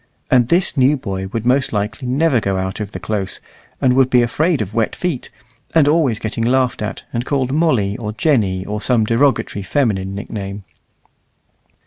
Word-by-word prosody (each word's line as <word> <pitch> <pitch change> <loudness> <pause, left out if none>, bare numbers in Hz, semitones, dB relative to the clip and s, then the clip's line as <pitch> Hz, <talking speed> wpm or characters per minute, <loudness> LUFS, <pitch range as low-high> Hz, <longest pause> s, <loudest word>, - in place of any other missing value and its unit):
And 125 -3 +4
this 175 +5 +2
new 135 +2 +4
boy 95 -6 -4
would 110 +3 -4
most 130 +2 +2
likely 105 +5 -3
never 135 +1 +2
go 100 -2 -1
out 95 +1 -3
of 105 -1 -5
the - - -6
close, 100 -3 -3 0.4
and 130 -1 +3
would 130 0 +4
be 125 -1 +4
afraid 155 +7 +1
of 105 -1 -4
wet 115 -1 0
feet, 170 -8 -3 0.5
and 155 -3 +5
always 145 -7 +2
getting 110 +1 -3
laughed 125 0 +1
at, 105 - -4
and 120 0 -1
called 130 -1 -1
Molly, 130 -11 +1
or 110 -4 -4
Jenny, 105 - +1
or 105 +1 -4
some 115 -3 +2
derogatory 115 -2 +1
feminine 95 -4 -1
nickname. 100 -1 -6
115 Hz, 175 wpm, -18 LUFS, 105-135 Hz, 0.5 s, and